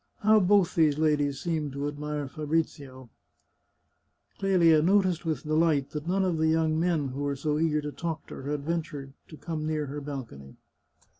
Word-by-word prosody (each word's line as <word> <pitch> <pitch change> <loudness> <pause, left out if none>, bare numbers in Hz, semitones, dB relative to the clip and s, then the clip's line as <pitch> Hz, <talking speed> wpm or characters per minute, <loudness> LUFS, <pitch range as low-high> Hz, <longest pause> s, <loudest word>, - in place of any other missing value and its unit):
How 215 +1 +5
both 195 -2 +3
those 155 -3 +3
ladies 145 -3 +1
seemed 155 -5 -2
to 140 +1 -3
admire 145 0 -4
Fabrizio! 140 -4 -3 0.6
" - - -44
Clelia 170 -5 +4
noticed 185 -1 +2
with 155 -4 -2
delight 155 -2 +1
that 150 +1 -5
none 190 +2 +1
of 175 -3 0
the 160 - +2
young 160 0 +2
men 165 -5 +1
who 135 +2 -5
were 140 -1 -1
so 150 +2 -1
eager 155 -2 +1
to 150 0 -5
talk 165 +1 -5
to - - -9
her 135 - -6
had 145 -1 -2
ventured 155 -4 -4
to 155 - -12
come 155 -2 -4
near 155 -1 -1
her 145 +1 -6
balcony. 120 - -8
155 Hz, 180 wpm, -28 LUFS, 145-165 Hz, 0.6 s, How